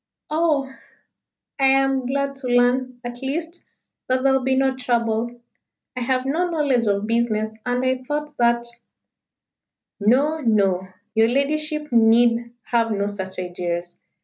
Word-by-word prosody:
"Oh! 305 -4 +1 0.9
I 270 - +3
am 270 -1 +2
glad 275 +1 -1
to 265 -2 -5
learn, 245 +1 +2
at 240 0 -7
least, 325 +6 -4 0.4
that 255 0 +1
there 270 -1 +4
will 265 - +2
be 260 +1 +1
no 265 0 +2
trouble. 235 -1 -1 0.6
I - - -3
have 255 +1 0
no 335 +6 0
knowledge 280 -8 +1
of 200 0 +1
business, 220 -1 0
and 245 +1 0
I 255 0 0
thought 295 +3 -4
that 235 0 +2 0.7
" - - -66
"No 270 +9 +2
no 195 -7 +1 0.3
your 220 0 +4
ladyship 300 +3 -1
need 235 +1 +4
have 230 -1 +1
no 200 -1 0
such 190 -2 -5
ideas. 175 -1 -4
245 Hz, 145 wpm, -22 LUFS, 225-270 Hz, 0.9 s, there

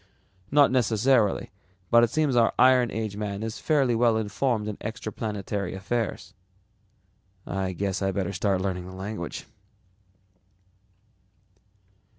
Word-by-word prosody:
"Not 145 -1 +5
necessarily, 120 -2 +2 0.4
but 120 0 +7
it 120 - +3
seems 145 0 +1
our 115 -1 +3
iron 125 -1 +5
age 105 -1 -4
man 105 0 -4
is 110 -1 -5
fairly 140 -6 +2
well 115 -1 +3
informed 110 +1 -1
in 105 - -4
extraplanetary 105 -3 -4
affairs." 100 -1 -3 1.1
"I 95 -1 -2
guess 95 +1 -2
I'd 95 -1 -1
better 100 -1 -2
start 95 +1 0
learning 90 -2 -3
the 95 - -9
language." 95 -2 -6
105 Hz, 120 wpm, -26 LUFS, 95-120 Hz, 1.1 s, but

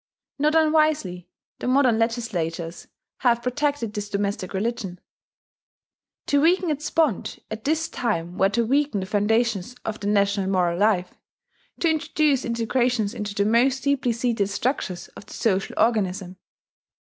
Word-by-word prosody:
Not 300 +2 +2
unwisely, 305 - +2 0.3
the - - -4
modern 255 -3 +3
legislators 180 -8 -2 0.3
have 235 -2 +2
protected 250 -3 -1
this 205 -1 -4
domestic 200 -2 -2
religion: 195 -3 -3 1.3
to 285 -1 +2
weaken 350 +1 +3
its 300 +1 -3
bond 310 - 0
at 220 0 -6
this 320 +2 +1
time 175 -7 -2
were 195 +1 +3
to 230 +3 +1
weaken 275 -4 +1
the - - -3
foundations 220 +2 0
of 220 0 -3
the 205 - -4
national 200 -1 +2
moral 180 -2 +1
life, 200 -4 +2 0.7
to 340 - +3
introduce 305 -2 +1
disintegrations 235 -2 0
into 210 -3 -5
the 200 - +1
most 250 +5 +2
deeply 280 -3 +1
seated 230 -3 0
structures 200 -4 -2
of - - -13
the - - -10
social 195 -4 0
organism. 190 -5 0
225 Hz, 140 wpm, -24 LUFS, 200-265 Hz, 1.3 s, modern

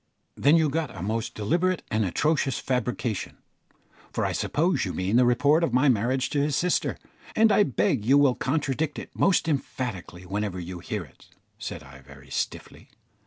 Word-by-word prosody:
"Then 145 +4 +4
you 160 -1 +3
got 155 0 -2
a 85 - -5
most 110 +3 -2
deliberate 175 - 0
and 110 0 +1
atrocious 135 - +1
fabrication, 125 -4 -2 0.7
for - - -1
I - - 0
suppose 165 -1 0
you 90 - -3
mean 95 +4 0
the 125 0 +5
report 145 +7 +3
of 140 - 0
my 135 +3 +4
marriage 125 +3 +1
to 145 - +1
his 145 -1 0
sister, 180 +5 0 0.4
and 220 0 +5
I 210 - +5
beg 115 - +1
you 135 +6 +5
will 140 -3 +5
contradict 145 +2 -1
it - - -7
most 185 -4 +2
emphatically 120 - -3
whenever 100 0 -3
you 90 0 -6
hear 100 +2 -4
it," 70 - -19 0.3
said - - -6
I, 70 +1 -13
very 70 -1 -15
stiffly. - - -4
125 Hz, 175 wpm, -26 LUFS, 100-150 Hz, 0.7 s, the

